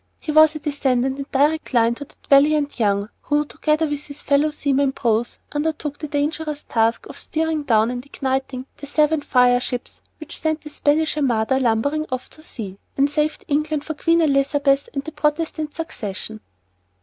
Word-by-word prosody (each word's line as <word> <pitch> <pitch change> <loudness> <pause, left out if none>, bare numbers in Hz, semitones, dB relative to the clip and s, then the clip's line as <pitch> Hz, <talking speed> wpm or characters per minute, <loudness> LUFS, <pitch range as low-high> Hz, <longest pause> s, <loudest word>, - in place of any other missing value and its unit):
He 310 - -4
was 310 0 +6
a - - -4
descendant 270 -3 0
in 275 - -5
direct 295 0 +1
line 230 0 +4
of 285 - -6
that - - -21
valiant 290 0 +4
Young 200 -1 +1
who, 295 0 +1
together 310 +2 0
with 290 -1 -4
his 285 0 -8
fellow 285 +2 +3
seaman 280 -2 +1
Prowse, 235 -2 0
undertook 295 -1 -2
the 305 - -4
dangerous 300 +1 -2
task 225 0 +1
of - - -10
steering 320 -1 -1
down 225 -4 +2
and 245 0 -5
igniting 265 -1 -3
the 285 - -8
seven 305 +1 +2
fire 250 -3 +4
ships 245 0 -5 0.2
which 310 0 -5
sent 315 0 -1
the 300 - -10
Spanish 305 +2 +1
armada 260 -2 +1
"lumbering 270 +6 +1
off" 255 0 -4
to 310 - -12
sea, 205 - -7 0.2
and 280 +1 +3
saved 305 +6 -1
England 300 0 0
for 315 - -3
Queen 330 +2 +2
Elizabeth 280 -1 +2
and 275 - -2
the 315 - -7
Protestant 300 0 -1
succession. 220 - -6
285 Hz, 175 wpm, -22 LUFS, 255-305 Hz, 0.2 s, was